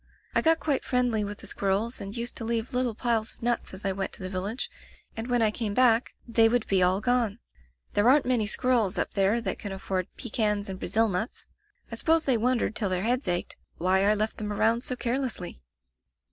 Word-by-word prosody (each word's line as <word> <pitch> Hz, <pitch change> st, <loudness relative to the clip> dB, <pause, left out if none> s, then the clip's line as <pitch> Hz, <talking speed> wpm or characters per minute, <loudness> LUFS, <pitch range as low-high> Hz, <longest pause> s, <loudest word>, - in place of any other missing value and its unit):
I -, -, +3 dB
got 325 Hz, 0 st, +3 dB
quite 285 Hz, -4 st, 0 dB
friendly 245 Hz, -4 st, +1 dB
with 205 Hz, 0 st, -5 dB
the -, -, -13 dB
squirrels, 200 Hz, +5 st, -1 dB
and 200 Hz, +3 st, -6 dB
used 235 Hz, +1 st, -4 dB
to -, -, -4 dB
leave 230 Hz, +2 st, -2 dB
little 250 Hz, -3 st, 0 dB
piles 225 Hz, -2 st, 0 dB
of -, -, -17 dB
nuts 240 Hz, 0 st, 0 dB
as 190 Hz, -, -9 dB
I 195 Hz, -, +2 dB
went 195 Hz, 0 st, -3 dB
to -, -, -9 dB
the 185 Hz, -, -5 dB
village, 200 Hz, +7 st, -2 dB, 0.5 s
and 225 Hz, +1 st, -4 dB
when 245 Hz, -2 st, +2 dB
I 215 Hz, -, +4 dB
came 210 Hz, -2 st, -3 dB
back 245 Hz, -2 st, +3 dB
they 225 Hz, -1 st, +4 dB
would 240 Hz, -1 st, +1 dB
be 195 Hz, -2 st, +2 dB
all 185 Hz, +2 st, +3 dB
gone. 235 Hz, -3 st, +1 dB, 0.6 s
There 205 Hz, +4 st, +4 dB
aren't 290 Hz, +2 st, +5 dB
many 245 Hz, -4 st, +2 dB
squirrels 230 Hz, -3 st, +1 dB
up -, -, 0 dB
there 200 Hz, +3 st, +2 dB
that 195 Hz, -4 st, -3 dB
can 205 Hz, -, -6 dB
afford 190 Hz, -1 st, -3 dB
pe 240 Hz, -, -5 dB
cans 210 Hz, -2 st, 0 dB
and 190 Hz, -1 st, -5 dB
Brazil 225 Hz, +1 st, +1 dB
nuts. 210 Hz, +3 st, -3 dB, 0.5 s
I -, -, -3 dB
suppose 325 Hz, -1 st, +2 dB
they 265 Hz, -, +3 dB
won 245 Hz, +3 st, +2 dB
dered -, -, -1 dB
till 210 Hz, -3 st, -1 dB
their 185 Hz, 0 st, -1 dB
heads 245 Hz, +1 st, 0 dB
ached, 175 Hz, 0 st, -2 dB, 0.2 s
why 185 Hz, +2 st, +2 dB
I 210 Hz, +1 st, +4 dB
left 215 Hz, +1 st, -1 dB
them 210 Hz, -1 st, -3 dB
around 225 Hz, +3 st, +2 dB
so 255 Hz, -, -2 dB
carelessly. 245 Hz, -, -3 dB
225 Hz, 225 wpm, -27 LUFS, 200-245 Hz, 0.6 s, aren't